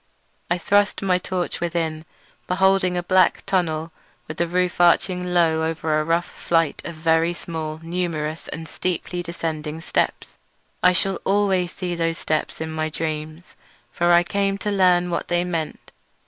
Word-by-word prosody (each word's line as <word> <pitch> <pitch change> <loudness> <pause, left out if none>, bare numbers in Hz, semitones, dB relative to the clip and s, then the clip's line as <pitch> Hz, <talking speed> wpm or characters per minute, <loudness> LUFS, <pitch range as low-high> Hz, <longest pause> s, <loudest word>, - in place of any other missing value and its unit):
I 175 - +2
thrust 205 +3 +2
my 180 -2 +2
torch 180 -1 -3
within, 165 -2 -2 0.4
beholding 185 -1 +3
a 175 - -1
black 185 0 +3
tunnel 165 -4 0 0.4
with 155 - -7
the 170 - +1
roof 180 +1 0
arching 180 +1 +3
low 165 -2 +3
over 160 -1 0
a - - +1
rough 165 +2 +1
flight 165 -3 0
of 170 - -6
very 165 +2 +2
small, 160 -2 -5
numerous, 165 -2 -3
and 160 0 -6
steeply 180 +1 -3
descending 160 -2 -4
steps. 165 - -2 0.4
I 180 - +6
shall 190 +1 0
always 190 -3 +1
see 180 -2 -3
those 165 -1 -1
steps 155 -2 -2
in 160 0 -4
my 155 0 -2
dreams, 155 +1 -5 0.4
for 175 0 +2
I 175 0 +6
came 195 +2 0
to 210 - +1
learn 180 -2 +3
what 170 - -2
they 175 0 +1
meant. 165 -3 -4
170 Hz, 160 wpm, -23 LUFS, 160-180 Hz, 0.4 s, I